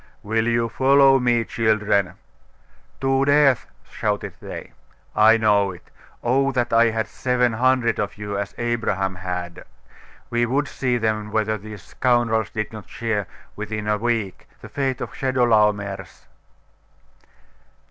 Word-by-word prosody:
'Will 110 +2 0
you 115 0 +1
follow 135 +2 +4
me, 120 -2 +2
children?' 105 -4 +1 0.8
'To 135 0 +1
death!' 140 -3 +4 0.2
shouted - - -3
they. - - -8 0.4
'I 110 +2 +6
know 105 -3 +3
it. 90 -2 -12 0.3
Oh 135 +3 +2
that 120 -2 -1
I 115 +1 +6
had 110 0 -1
seven 125 -2 0
hundred 125 0 +2
of 105 - -3
you, 105 -1 -5
as 100 0 -4
Abraham 110 -5 -1
had! 90 -1 -5 0.7
We 120 0 +1
would 140 +4 0
see 125 -2 -1
then 110 -2 -1
whether 110 0 0
these 105 -2 -10
scoundrels 120 -2 +1
did 110 0 -4
not 105 -5 -10
share, 110 -5 -2 0.3
within 105 0 -5
a 105 0 +1
week, 115 -4 -2
the - - -11
fate 135 -2 -2
of - - -5
Chedorlaomer's. 105 - 0
115 Hz, 135 wpm, -22 LUFS, 105-125 Hz, 0.8 s, I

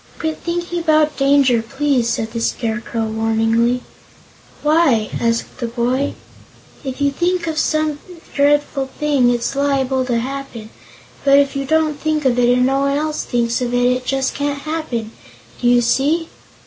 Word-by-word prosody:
"Quit 315 -1 -3
thinking 345 0 -3
about 310 -2 +2
danger, 275 -4 +3
please," 265 0 0
said 225 -1 -2
the 230 - -3
Scarecrow, 230 0 -2
warningly. 225 +2 +1 0.8
"Why?" 295 -8 +3
asked 230 0 -1
the 235 - -2
boy. 245 +4 -1 0.7
"If 265 -1 -5
you 285 0 +2
think 350 +4 0
of 320 -2 -2
some 310 -1 0 0.3
dreadful 285 -1 +1
thing, 285 -5 +3
it's 240 +2 -1
liable 270 -2 +1
to 245 -2 0
happen, 250 -3 -5 0.5
but 275 0 +5
if 280 -1 +2
you 275 0 -2
don't 310 0 +1
think 310 -1 -1
of 250 -1 +2
it, 240 0 +4
and 250 0 +3
no 270 +1 +1
one 280 0 +1
else 305 0 -2
thinks 235 0 -1
of 245 0 -1
it, 245 0 +3
it 250 0 -1
just 265 +1 -1
can't 285 0 -2
happen. 305 -9 -3 0.5
Do 245 - +1
you 245 0 +5
see?" 295 +7 +1
270 Hz, 160 wpm, -18 LUFS, 240-295 Hz, 0.8 s, but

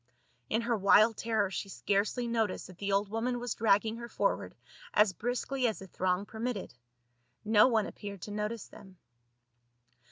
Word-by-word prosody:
In 225 - +1
her 235 0 +1
wild 215 +2 +5
terror 220 -4 0
she 195 - -4
scarcely 205 +5 0
noticed 225 -4 -1
that 185 0 -13
the 200 0 -2
old 200 +1 +2
woman 240 +3 -1
was 245 -2 -2
dragging 220 +1 +2
her 235 0 -7
forward - - -1 0.4
as 210 -2 +5
briskly 245 +5 -1
as 220 - -2
the 195 - -9
throng 185 +1 -1
permitted. 225 -1 -4 0.7
No 215 +2 +6
one 225 -4 +2
appeared 200 -3 -8
to 210 - -6
notice 210 +2 -3
them. 190 -3 -15
215 Hz, 160 wpm, -31 LUFS, 200-230 Hz, 0.7 s, No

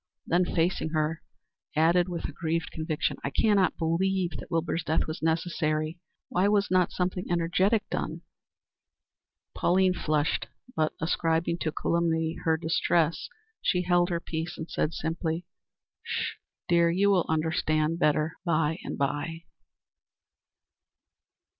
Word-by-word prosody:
Then 180 +2 +2
facing 170 -1 0
her, 155 +1 0 0.5
added, 170 +3 +4
with 170 -2 -4
aggrieved 160 +1 -2
conviction: 155 -1 -2
"I - - -1
cannot 200 +3 +3
believe 175 +2 +1
that - - -10
Wilbur's 165 0 -1
death 160 0 +1
was 155 - -5
necessary. 160 0 0 0.3
Why 185 +3 +2
was 205 -1 +2
not 185 -1 +3
something 180 0 -2
energetic 185 +5 +2
done?" - - -3 1.3
Pauline 185 +1 +3
flushed, 155 -3 0 0.3
but, 155 -1 +1
ascribing 165 +1 0
the 155 - 0
calumny 165 0 0
to 160 -1 +2
distress, 165 0 +1 0.3
she 180 -1 +1
held 175 0 +3
her 170 -1 0
peace, 165 +1 -4
and 160 - -5
said, 155 - -1
simply: 165 +1 -2 0.6
"Sh! - - -2 0.3
dear. 170 -1 +4
You 195 +4 +3
will 185 -3 +2
understand 160 0 +1
better 150 0 +2
by 160 -2 +1
and - - -5
by." 145 +4 -2
165 Hz, 125 wpm, -28 LUFS, 160-175 Hz, 1.3 s, added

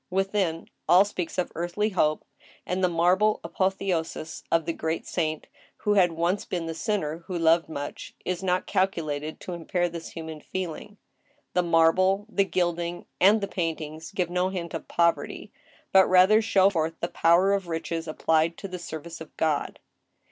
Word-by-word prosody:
Within, 190 -3 0 0.2
all 180 +4 +7
speaks 180 -5 -5
of 180 - -1
earthly 175 +6 -1
hope, 155 -6 +1 0.4
and 185 +1 -2
the 180 - +4
marble 180 +5 +3
apotheosis 185 -4 -2
of 165 -1 +2
the 165 - -1
great 160 +1 -3
saint, 155 -3 -2 0.3
who 210 - +1
had 180 -4 +4
once 170 +4 0
been 175 -2 -3
the 165 - -3
sinner 165 -5 -2
who 180 - -3
loved 165 0 +3
much, 145 -2 -6
is 185 -1 -2
not 185 -1 0
calculated 155 -5 -1
to 180 - -6
impair 175 +1 -1
this 170 -1 -8
human 160 -2 -7
feeling. 185 +3 -6 0.6
The 180 - +3
marble, 180 +4 +3
the 200 -3 +2
gilding, 175 -2 -1
and 205 +4 +5
the 200 - -1
paintings 160 -3 -4
give 180 -3 -2
no 180 +1 +1
hint 175 -3 -5
of 165 - -5
poverty, 170 -1 0 0.4
but 190 -1 +6
rather 185 +4 +6
show 200 -3 +4
forth 165 -2 -1
the 170 - -1
power 175 +4 +3
of 195 -3 -1
riches 165 0 -3
applied 160 +1 +1
to 195 - -6
the 180 -1 -6
service 165 0 -7
of 160 - -11
God. 155 -3 0
175 Hz, 170 wpm, -26 LUFS, 165-190 Hz, 0.6 s, all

